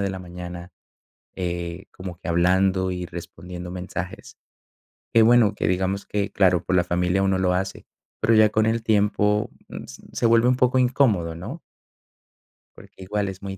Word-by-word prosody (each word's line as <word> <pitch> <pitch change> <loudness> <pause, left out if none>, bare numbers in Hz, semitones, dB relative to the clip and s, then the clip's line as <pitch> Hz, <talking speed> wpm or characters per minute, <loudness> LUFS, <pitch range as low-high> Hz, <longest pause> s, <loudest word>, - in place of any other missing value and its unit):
de 100 - 0
la 95 -1 -5
mañana, 90 0 -8 0.6
eh, 85 0 -4
como 90 -2 -8
que 90 - -9
hablando 95 +2 +2
y 90 -1 -4
respondiendo 90 +1 -8
mensajes. 90 0 -6 0.8
Que 115 - +7
bueno, 115 -2 +5
que - - -1
digamos 95 +2 -1
que, 100 -1 -2
claro, 90 -3 +3
por 95 - -1
la 90 - +4
familia 90 +2 0
uno 95 -1 +2
lo 90 -1 +2
hace, 95 +1 -3 0.3
pero 110 +1 +3
ya 110 -1 +6
con 110 +1 +1
el 115 +1 0
tiempo 105 -1 +2 0.2
mm, - - -8 0.3
se - - -3
vuelve 115 +1 +4
un 125 - +3
poco 125 0 +2
incómodo, 120 -10 +2
¿no? 85 +2 -7 1.2
Porque - - -14
igual 100 +1 -2
es 95 -1 -9
muy 95 -1 -6
95 Hz, 170 wpm, -23 LUFS, 90-105 Hz, 1.2 s, Que